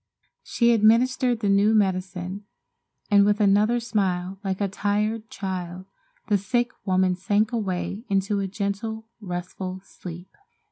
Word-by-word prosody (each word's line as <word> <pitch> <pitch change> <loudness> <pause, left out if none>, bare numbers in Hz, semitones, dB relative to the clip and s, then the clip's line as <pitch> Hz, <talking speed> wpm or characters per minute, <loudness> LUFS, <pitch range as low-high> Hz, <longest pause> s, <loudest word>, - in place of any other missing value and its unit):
She 235 -1 +2
administered 235 +2 +3
the 205 - 0
new 200 +2 +4
medicine, 190 -1 -1 0.7
and 200 -1 +7
with 205 +1 +2
another 210 +3 +4
smile 195 -5 -1
like 190 -1 -2
a 200 - +1
tired 210 +3 -1
child 185 -2 -5 0.4
the 205 -2 +2
sick 240 +6 0 0.2
woman 185 -1 +3
sank 205 +4 +1
away 200 -2 -2
into 195 +1 +1
a 195 - -1
gentle, 205 +3 -3
restful 185 -1 -5
sleep. 175 -1 -10
200 Hz, 130 wpm, -25 LUFS, 185-220 Hz, 0.7 s, and